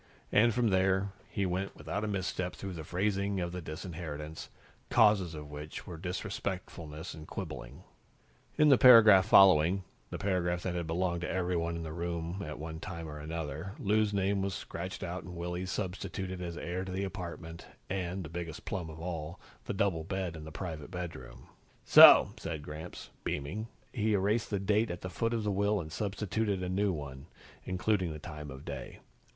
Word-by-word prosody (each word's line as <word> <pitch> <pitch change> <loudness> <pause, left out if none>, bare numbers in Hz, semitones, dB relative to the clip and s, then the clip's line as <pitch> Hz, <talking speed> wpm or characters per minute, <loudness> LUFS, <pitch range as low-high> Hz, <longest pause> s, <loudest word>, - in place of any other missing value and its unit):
And, 115 +3 +5
from 115 0 +2
there, 95 +1 +2 0.2
he 100 - -1
went 95 +2 -2
without 80 +8 -4
a - - -1
misstep 95 -2 -2
through 95 -1 -6
the 80 -2 -6
phrasing 100 +3 0
of 85 -1 -2
the 90 0 -5
disinheritance, 80 -1 -6 0.4
causes 105 -7 +4
for 75 - -6
which 75 +1 -8
were 85 - -7
disrespectfulness 90 -4 -4
and 80 0 -10
quibbling. 60 +8 -7 0.7
In 150 -1 +6
the 135 - +7
paragraph 110 -6 +9
following, 95 -2 +6 0.3
the - - -4
paragraph 90 -3 0
that 90 - -1
had 85 -2 -2
belonged 85 +1 0
to - - -3
everyone 90 -2 0
in 85 - -4
the 80 -1 -5
room 85 +2 -3
at 75 0 -6
one 80 +1 -6
time 85 -1 -6
or 75 -1 -7
another, 80 +3 -5
Lou's 105 0 +2
name 100 0 +1
was 95 -1 -1
scratched 95 +3 -6
out 90 0 -4
and 90 0 -9
Willy's 90 +2 -3
substituted 95 -1 -4
as 85 -1 -5
heir 90 +2 -3
to 95 - -6
the 95 +2 -2
apartment 85 -3 -6 0.2
and, 95 0 -2
the - - -6
biggest 85 -2 -6
plum 85 -2 -3
of 80 0 -9
all, 80 -2 -5 0.3
the - - -3
double 95 -5 +1
bed 95 -1 -3
in 80 -1 -8
the 80 - -8
private 80 -3 -6
bedroom. 85 -8 -7 0.4
"So!" - - +10
said 80 -3 -5
Gramps, 75 +4 -8
beaming. 90 +11 -3 0.3
He 110 -3 +1
erased 105 +4 +1
the 100 - 0
date 105 +3 +2
at 85 - -5
the 90 - -5
foot 115 +6 0
of 115 - -1
the 105 - 0
will 100 +1 +2
and 80 -3 -6
substituted 100 +1 -1
a 90 - -2
new 100 +2 +2
one, 70 -5 -6 0.4
including 95 -1 0
the 75 - -5
time 75 -2 -8
of 65 +1 -9
day. - - -6
90 Hz, 185 wpm, -31 LUFS, 80-100 Hz, 0.7 s, So